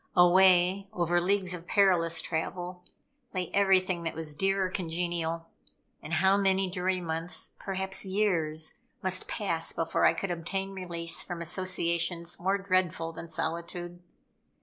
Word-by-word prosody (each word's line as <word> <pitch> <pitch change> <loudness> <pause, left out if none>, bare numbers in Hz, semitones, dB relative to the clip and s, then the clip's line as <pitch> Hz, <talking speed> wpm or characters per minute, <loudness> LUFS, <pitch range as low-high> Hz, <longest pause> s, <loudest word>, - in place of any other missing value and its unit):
Away, 185 +1 +5
over 175 -3 +1
leagues 190 0 +1
of 175 -1 -8
perilous 170 -5 +3
travel, 180 +2 -4 0.5
lay 180 -2 -2
everything 190 -3 +3
that 165 -1 -4
was 160 -2 -4
dear 195 +5 +1
or - - -2
congenial; 170 -2 -2 0.6
and 155 +2 -7
how 190 +4 +4
many 195 -1 +2
dreary 185 0 0
months, 165 0 -2
perhaps 190 0 -1
years, 175 -6 0 0.2
must 185 0 +1
pass 170 -7 -1
before 165 -1 +1
I - - +6
could 195 - -3
obtain 190 +3 -3
release 170 -3 -1
from 175 -1 -5
associations 170 -1 -1
more 190 +3 +1
dreadful 185 -4 0
than 165 +1 -9
solitude. 170 +2 -4
180 Hz, 135 wpm, -29 LUFS, 170-190 Hz, 0.6 s, I